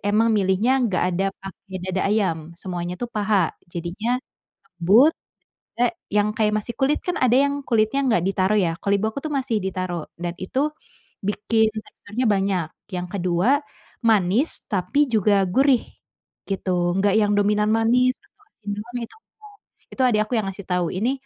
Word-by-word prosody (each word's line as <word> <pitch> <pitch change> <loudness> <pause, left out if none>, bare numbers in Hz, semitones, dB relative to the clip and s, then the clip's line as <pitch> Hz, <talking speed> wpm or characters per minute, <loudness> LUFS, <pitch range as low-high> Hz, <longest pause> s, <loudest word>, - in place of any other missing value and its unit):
emang 215 +3 +2
milihnya 210 +6 +2
nggak 185 - 0
ada 190 +3 0
pakai 195 0 -9
dada 185 0 -1
ayam, 200 -6 +1 0.2
semuanya 175 -1 -4
tuh 245 - -3
paha 210 -2 +1 0.2
jadinya 180 +9 -2 0.6
lembut 215 - +6 0.7
eh, 245 - +4 0.2
yang 210 0 +3
kayak 210 -1 +2
masih 235 - -6
kulit 280 +2 +2
kan 360 - -1
ada 250 -1 +3
yang 280 +2 +3
kulitnya 225 +3 +2
nggak 200 -9 +2
ditaruh 195 +1 +1
ya, 170 -3 +1
kalau 200 - +1
ibu 205 +2 -1
aku 250 - -6
tuh 310 - -3
masih 255 -5 0
ditaruh 185 -3 -3 0.2
dan 175 0 -2
itu 185 +7 -3 0.7
bikin 220 +2 +2 0.2
teksturnya 230 +5 -4
banyak, 195 -4 +1 0.3
yang 180 0 -3
ke-2 190 - +1 0.4
manis 220 - +2
tapi 260 +9 +1
juga 205 -2 +3
gurih 265 +4 +3 0.7
gitu, 195 -1 -2 0.3
enggak 195 0 +2
yang 205 -1 +2
dominan 210 +1 +2
manis 240 +3 +3
atau 415 0 -31
asin 210 - -9
juga 215 - -7
gitu 230 - -8
enggak, 425 -2 -19 0.4
itu 265 - -2
adik 215 -3 +2
aku 215 - -14
yang 215 - -1
ngasih 195 0 -8
tahu, 180 -1 +1
"Ini, 225 +8 0
210 Hz, 165 wpm, -23 LUFS, 190-240 Hz, 0.7 s, lembut